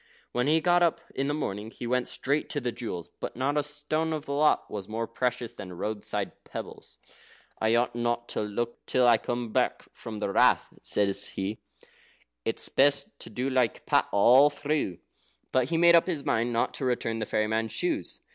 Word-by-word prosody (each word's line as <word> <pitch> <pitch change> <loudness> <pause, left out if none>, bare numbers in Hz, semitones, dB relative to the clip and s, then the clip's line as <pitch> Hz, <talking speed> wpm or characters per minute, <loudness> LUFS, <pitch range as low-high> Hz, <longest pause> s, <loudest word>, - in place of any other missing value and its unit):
When 125 +2 0
he 160 +2 +4
got 175 +1 +4
up 170 -2 +3
in 135 +1 -1
the 145 - 0
morning, 105 -6 -3
he 120 - -8
went 125 +1 0
straight 145 +3 -1
to 145 - -1
the 125 -3 -2
jewels. 90 -8 -6
But - - -5
not 135 +4 0
a 150 - +3
stone 150 +2 -1
of 155 -1 -4
the 140 - -3
lot 150 +2 +3
was 100 -2 -6
more 115 +1 -2
precious 125 0 -2
than 95 -6 -8
roadside 105 +4 -4
pebbles. - - -9 0.6
"I 110 +1 +3
ought 120 +1 +1
not 120 0 -1
to - - -2
look 115 +3 -3
till 125 -1 +3
I 115 -2 +6
come 120 -2 -3 0.4
from 110 -2 -8
the 105 -1 -2
Rath," - - +4
said 100 -1 +1 0.2
he. 100 +3 -3 0.9
"It's - - +2
best 140 0 +3
to - - -9
do 125 +2 -2
like 125 -4 +1
Pat - - +3
all 125 +8 +6
through." 145 - -2 0.5
But 130 0 +2
he 165 - +1
made 170 +1 +6
up 170 +1 +5
his 160 -6 -2
mind 115 +2 +1
not 115 0 0
to 135 - -4
return 115 -2 -1
the 110 - -3
fairy 110 - +1
man's 110 +1 -1
shoes. 330 -4 -2
120 Hz, 195 wpm, -28 LUFS, 110-145 Hz, 0.9 s, I